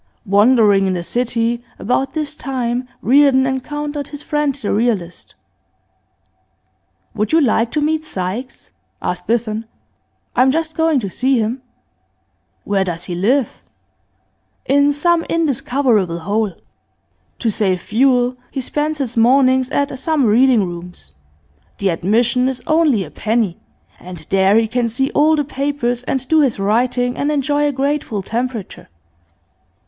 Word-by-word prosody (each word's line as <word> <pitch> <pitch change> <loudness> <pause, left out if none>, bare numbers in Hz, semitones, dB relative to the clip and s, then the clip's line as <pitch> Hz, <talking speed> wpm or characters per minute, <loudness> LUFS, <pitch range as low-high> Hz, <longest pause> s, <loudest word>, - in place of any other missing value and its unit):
Wandering 205 -1 +4
in 185 - 0
the 175 - -3
city, 235 +2 -1
about 250 +5 -1
this 305 -2 -3
time, 250 -4 -3 0.2
Reardon 265 +1 +4
encountered 290 +2 -3
his 290 0 -9
friend 295 -3 -1
the 245 -8 -3
realist. 205 -6 -2 1.8
'Would 215 -1 -2
you 325 - +5
like 235 -5 +2
to 300 - -1
meet 310 +1 0
Sykes?' 220 0 -6 0.3
asked 180 - -4
Biffen. 225 -1 -1 0.7
'I - - +3
am 260 - +5
just 320 +3 -1
going 320 -3 +2
to 200 - -4
see 260 +5 +1
him.' 230 +3 -1 1.0
'Where 200 -1 0
does 175 -2 -4
he 180 - -5
live?' 230 +9 0 1.0
'In 285 +1 +3
some 330 +3 +1
indiscoverable 245 - 0
hole. 205 +2 -1 0.8
To 230 - 0
save 190 -3 0
fuel, 250 +4 +2
he - - -5
spends 300 +4 -2
his 260 -5 -3
mornings 255 +2 +3
at 280 -2 -1
some 305 -1 +1
reading 235 +1 +4
rooms; 175 - -9 0.7
the 200 - 0
admission 235 +9 +1
is 255 -2 -6
only 310 -10 +2
a 155 - -11
penny, 215 +1 -1 0.4
and 180 0 -9
there 195 +1 +4
he 225 0 +2
can 235 +1 -1
see 265 +4 -1
all 310 +2 +3
the 295 - 0
papers 275 -4 -2
and 265 -1 -2
do 315 +1 +4
his 270 -5 +1
writing 245 +5 0
and 290 +2 0
enjoy 290 0 +1
a - - 0
grateful 270 -6 -2
temperature. 235 -1 -5
250 Hz, 140 wpm, -18 LUFS, 215-285 Hz, 1.8 s, you